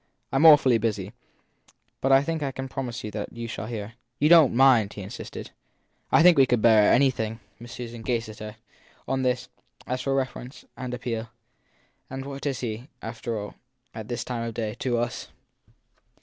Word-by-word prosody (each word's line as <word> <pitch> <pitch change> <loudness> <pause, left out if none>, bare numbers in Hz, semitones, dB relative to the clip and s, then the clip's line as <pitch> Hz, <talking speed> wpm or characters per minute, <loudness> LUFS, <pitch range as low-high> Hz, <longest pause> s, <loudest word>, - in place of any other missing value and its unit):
I - - +1
m 160 +4 +7
awfully 135 -6 +7
busy, 105 -2 -2 0.9
but 135 - +1
I 135 +1 +6
think 160 +1 -2
I 140 -2 -1
can 135 0 -6
promise 125 -2 -5
you 105 - -5
that 105 0 -5
you 115 0 -6
shall 110 -1 -5
hear. 110 -2 -6 0.2
You 150 +2 +3
don 165 -5 +8
t - - -6
mind? 120 -5 +5
he 100 - -7
insisted. 105 +6 -8 0.6
I 160 - +6
think 175 -4 +7
we 135 - +6
could 125 -2 +2
bear 110 -2 +5
anything, 120 -4 +2
said - - -12
Miss 105 -2 -31
Amy. - - -17
Miss 120 - -10
Susan 120 -1 -7
gazed 115 -1 -2
at 105 - -11
her, 105 0 -7 0.5
on 135 0 0
this, 125 0 0 0.4
as 125 0 -3
for 135 -1 0
reference 130 -1 -4
and 125 -1 -5
appeal. 115 -2 -4 0.8
And 135 +1 -6
what 140 +1 -5
is 135 -3 -2
he, 120 +3 -5
after 115 0 -4
all, 105 0 -6 0.4
at 110 -2 -7
this 120 -1 -3
time 120 -2 -4
of 115 -1 -4
day, 110 -2 -2
to 125 -2 0
us? 120 0 -3
120 Hz, 205 wpm, -26 LUFS, 110-135 Hz, 0.9 s, don